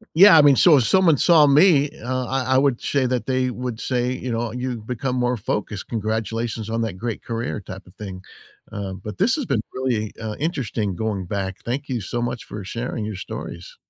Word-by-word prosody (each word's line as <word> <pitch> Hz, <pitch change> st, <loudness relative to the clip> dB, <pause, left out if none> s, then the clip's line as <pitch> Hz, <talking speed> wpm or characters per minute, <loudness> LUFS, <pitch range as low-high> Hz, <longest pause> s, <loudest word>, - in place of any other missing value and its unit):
Yeah, 185 Hz, +1 st, +9 dB
I 155 Hz, -, +8 dB
mean, 145 Hz, -2 st, +6 dB
so 165 Hz, +1 st, +7 dB
if 130 Hz, -, +3 dB
someone 175 Hz, -, +4 dB
saw 160 Hz, -1 st, +6 dB
me, 145 Hz, 0 st, +5 dB
uh, 130 Hz, +1 st, -2 dB
I 130 Hz, 0 st, 0 dB
I -, -, +5 dB
would 135 Hz, -3 st, +2 dB
say 140 Hz, -2 st, 0 dB
that 125 Hz, -1 st, -1 dB
they 130 Hz, -1 st, +1 dB
would 125 Hz, -2 st, -5 dB
say, 125 Hz, -1 st, 0 dB
you 125 Hz, -1 st, -4 dB
know, 115 Hz, 0 st, -1 dB
"You've 125 Hz, -2 st, -4 dB
become 125 Hz, +2 st, -3 dB
more 125 Hz, 0 st, +1 dB
focused, 105 Hz, -1 st, -3 dB
congratulations 110 Hz, 0 st, -3 dB
on 115 Hz, +1 st, -1 dB
that 110 Hz, -5 st, -2 dB
great 115 Hz, +4 st, -4 dB
career," 115 Hz, -2 st, -3 dB
type 95 Hz, 0 st, -10 dB
of 90 Hz, -, -18 dB
thing, 95 Hz, -3 st, -8 dB, 0.5 s
uh, 100 Hz, -2 st, -4 dB
but 100 Hz, +3 st, -8 dB
this 235 Hz, -, +3 dB
has 285 Hz, -, -3 dB
been 130 Hz, -, +1 dB
really, 120 Hz, -5 st, -1 dB
uh, 110 Hz, -1 st, -4 dB
interesting 115 Hz, -, -2 dB
going 105 Hz, -3 st, -2 dB
back, 95 Hz, 0 st, -3 dB
thank 130 Hz, +5 st, -3 dB
you 125 Hz, -3 st, -2 dB
so 115 Hz, +4 st, -3 dB
much 120 Hz, 0 st, -3 dB
for 105 Hz, -2 st, -8 dB
sharing 115 Hz, +2 st, -4 dB
your 105 Hz, 0 st, -4 dB
stories. 90 Hz, -2 st, -8 dB
120 Hz, 210 wpm, -22 LUFS, 105-130 Hz, 0.5 s, Yeah